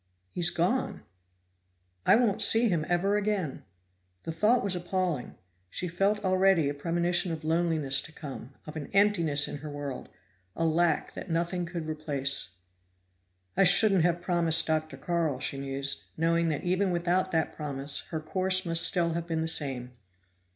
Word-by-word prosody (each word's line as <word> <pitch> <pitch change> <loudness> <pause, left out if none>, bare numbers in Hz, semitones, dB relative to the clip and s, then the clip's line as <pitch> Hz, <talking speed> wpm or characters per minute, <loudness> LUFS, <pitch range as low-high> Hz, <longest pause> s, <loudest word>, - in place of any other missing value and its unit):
"He's 175 -1 +3
gone! 190 +10 -1 1.0
I - - +7
won't 230 -3 +1
see 225 +1 +6
him 165 -4 -1
ever 195 +4 +1
again." 200 -8 -2 0.6
The - - -5
thought 210 +9 +2
was 195 -2 -1
appalling; 175 -5 -3 0.3
she 180 - -5
felt 200 +4 -1
already 185 -4 +3
a 145 - -2
premonition 175 +4 -1
of 160 -1 -6
loneliness 160 -4 +1
to - - -10
come, 140 -5 -9
of 155 - -10
an 150 -3 -6
emptiness 170 -8 +3
in - - -6
her 150 +2 -9
world, 145 -3 -7 0.5
a 165 - -1
lack 165 0 0
that - - -9
nothing 175 +1 -2
could 170 -2 -6
replace. 140 - -3 1.1
"I - - +4
shouldn't 195 0 +5
have 175 0 0
promised 170 -2 +3
Dr. 155 0 -2
Carl," 165 -6 -2
she 135 +1 -4
mused, 135 0 -2
knowing 165 +1 +1
that 150 - -3
even 185 +2 0
without 180 +2 0
that 160 -1 -1
promise 140 -1 -2
her 160 - -3
course 185 +4 +1
must 165 0 +3
still 170 -2 +3
have 170 0 -4
been 165 -1 -2
the 160 - -2
same. 135 -6 0
170 Hz, 160 wpm, -28 LUFS, 155-185 Hz, 1.1 s, I